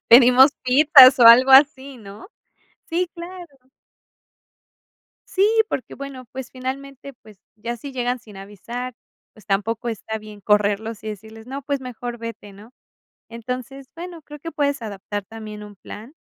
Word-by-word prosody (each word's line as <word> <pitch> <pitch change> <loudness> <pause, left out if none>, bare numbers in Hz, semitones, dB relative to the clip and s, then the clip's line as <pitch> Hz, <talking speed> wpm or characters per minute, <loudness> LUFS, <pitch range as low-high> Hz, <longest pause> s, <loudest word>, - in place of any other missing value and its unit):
Pedimos 250 +3 +7
pizzas, 265 0 +7
o, - - +7
algo 255 +3 +8
así, 270 -1 +4
¿no? 205 - -13 0.6
Sí, 350 +1 -1
claro. 340 -7 -11 1.6
Sí, 390 +2 +2 0.2
porque 260 - -5
bueno, 275 -2 -9
pues, 260 -1 -8
finalmente 275 +1 -7
pues, 215 -5 -19 0.2
ya 235 +3 -5
si 275 +4 -9
llegan 250 0 -2
sin 210 -4 -15
avisar, 230 +6 -8 0.4
pues, 215 - -19
tampoco 220 +4 -2
está 220 0 -6
bien 210 -1 -12
correrlos, 210 +2 0
y - - -5
decirles: 220 +2 -10
"No, 270 +2 -6
pues 280 -1 -4
mejor 245 -1 -7
vete", 230 -3 -9
¿no? 210 +4 -15 0.6
Entonces, 255 +3 -7
bueno 345 -1 -9
creo 295 0 -12
que 330 +3 -8
puedes 285 -4 -1
adaptar 205 -1 -6
también 215 -1 -10
un 205 0 -13
plan. 215 +6 -12
245 Hz, 145 wpm, -21 LUFS, 215-275 Hz, 1.6 s, algo